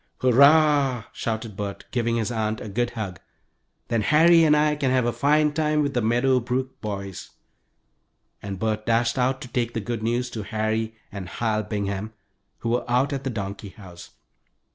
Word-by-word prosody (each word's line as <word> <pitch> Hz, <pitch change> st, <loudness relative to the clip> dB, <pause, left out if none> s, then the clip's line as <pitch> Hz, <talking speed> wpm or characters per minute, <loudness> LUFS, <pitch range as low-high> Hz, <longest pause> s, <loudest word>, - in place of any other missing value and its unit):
"Hurrah!" 140 Hz, -1 st, +5 dB
shouted 110 Hz, -2 st, -4 dB
Bert, 100 Hz, 0 st, -5 dB
giving 120 Hz, -2 st, 0 dB
his 115 Hz, 0 st, -1 dB
aunt 110 Hz, -1 st, -1 dB
a -, -, -7 dB
good 120 Hz, +4 st, -1 dB
hug. 95 Hz, -6 st, -4 dB, 0.7 s
"Then 115 Hz, -2 st, +1 dB
Harry 165 Hz, +9 st, +5 dB
and 150 Hz, -1 st, +5 dB
I 150 Hz, 0 st, +2 dB
can 140 Hz, -3 st, 0 dB
have 130 Hz, -2 st, +2 dB
a 120 Hz, -, 0 dB
fine 150 Hz, +1 st, +2 dB
time 150 Hz, -1 st, +1 dB
with 140 Hz, -1 st, -2 dB
the 120 Hz, -, +1 dB
Meadow 120 Hz, +4 st, +2 dB
Brook 130 Hz, +2 st, -3 dB
boys," 100 Hz, -3 st, -6 dB, 1.1 s
and 100 Hz, -1 st, -5 dB
Bert 110 Hz, +1 st, -2 dB
dashed 115 Hz, +2 st, +1 dB
out 130 Hz, +1 st, +1 dB
to -, -, -7 dB
take 120 Hz, -1 st, -2 dB
the -, -, 0 dB
good 115 Hz, +1 st, -4 dB
news 120 Hz, +2 st, -1 dB
to 110 Hz, -, -5 dB
Harry 110 Hz, +1 st, -2 dB, 0.2 s
and 95 Hz, -3 st, -7 dB
Hal 110 Hz, +1 st, -1 dB
Bingham, 105 Hz, 0 st, -4 dB, 0.5 s
who 115 Hz, -, -2 dB
were 120 Hz, 0 st, -1 dB
out 130 Hz, +4 st, +2 dB
at 135 Hz, -1 st, -3 dB
the 135 Hz, -, -2 dB
donkey 100 Hz, -3 st, -5 dB
house. 90 Hz, -4 st, -13 dB
115 Hz, 180 wpm, -24 LUFS, 110-130 Hz, 1.1 s, Hurrah